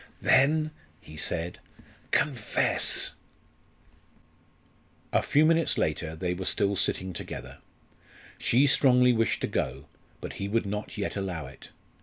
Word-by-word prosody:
"Then!" 155 +3 +4 0.3
he 75 - -13
said 85 +2 -2 0.5
"confess!" 125 -8 +1 2.0
A - - +4
few 150 +2 +3
minutes 165 0 +2
later 80 +1 -1
they 90 +2 -2
were 95 +1 -5
still 100 +1 +1
sitting 95 0 -1
together. - - -8 0.8
She 130 +4 +3
strongly 125 -3 +5
wished 115 -1 +1
to - - 0
go; 65 +4 -3 0.3
but - - -7
he 100 - -1
would 115 +2 0
not 105 +2 -5
yet 100 - -3
allow 90 -6 -3
it. 65 0 -13
100 Hz, 125 wpm, -28 LUFS, 90-130 Hz, 2.0 s, strongly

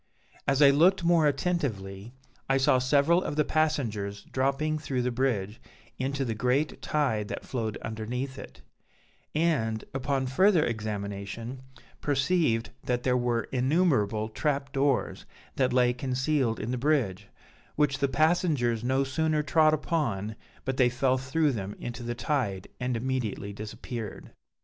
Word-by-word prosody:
As 140 +1 +4
I 140 - +8
looked 175 +6 +4
more 170 -2 +4
attentively, 120 - -2 0.4
I 135 - +4
saw 130 -1 +4
several 145 +7 +3
of 145 - -3
the 150 -1 +2
passengers 110 -11 -1
dropping 140 +4 0
through 130 -4 -2
the 125 - 0
bridge, 115 -5 -1 0.4
into 135 +1 -1
the 115 - -1
great 125 +7 0
tide 130 -9 0
that - - -6
flowed 110 -5 -3
underneath 125 +5 -4
it; - - -11 0.7
and, 135 -10 +1
upon 135 0 -1
further 170 +6 +4
examination, 105 +2 -4 0.4
perceived 140 -4 +1
that 125 -1 -1
there 125 -1 +2
were 120 -2 +1
innumerable 130 - +2
trap 140 +3 -1
doors 135 -1 0 0.3
that 130 -1 +2
lay 125 -1 +3
concealed 130 -1 0
in 110 +3 -3
the 125 - -2
bridge, 125 -10 0 0.5
which 145 -2 +1
the 140 - +2
passengers 150 - +2
no 130 +2 +2
sooner 155 +2 0
trod 155 +2 +4
upon, 120 - -1 0.3
but 130 0 -2
they 125 -2 +5
fell 130 +1 +1
through 145 +3 +1
them 100 -4 -4
into 120 +1 -6
the 120 0 -3
tide 120 -9 -1
and 125 -2 -1
immediately 115 -5 -2
disappeared. 110 +1 -7
130 Hz, 140 wpm, -28 LUFS, 115-145 Hz, 0.7 s, I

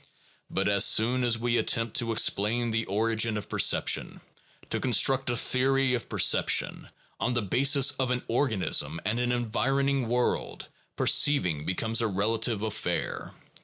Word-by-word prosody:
But - - -1
as 100 -1 +2
soon 125 +3 +3
as 120 -2 +1
we 120 +1 0
attempt 115 0 -1
to 115 -2 0
explain 115 +2 0
the 115 0 -1
origin 110 +2 0
of 105 - -7
perception, - - +1 0.5
to - - -1
construct 130 +2 +2
a 120 - 0
theory 135 +2 +1
of 120 - -4
per - - -5
ception, - - +1 0.3
on 125 - -1
the 120 -2 -1
basis 135 +6 +3
of 130 -2 -3
an 125 0 -2
organism 115 - 0
and 110 +4 -1
an 125 0 -1
environing 130 +3 -1
world, 120 +1 -2 0.3
perceiving 90 - +2
becomes 110 +5 -1
a 115 - 0
relative 110 +2 -1
affair. 110 -5 -4
115 Hz, 150 wpm, -27 LUFS, 110-125 Hz, 0.5 s, soon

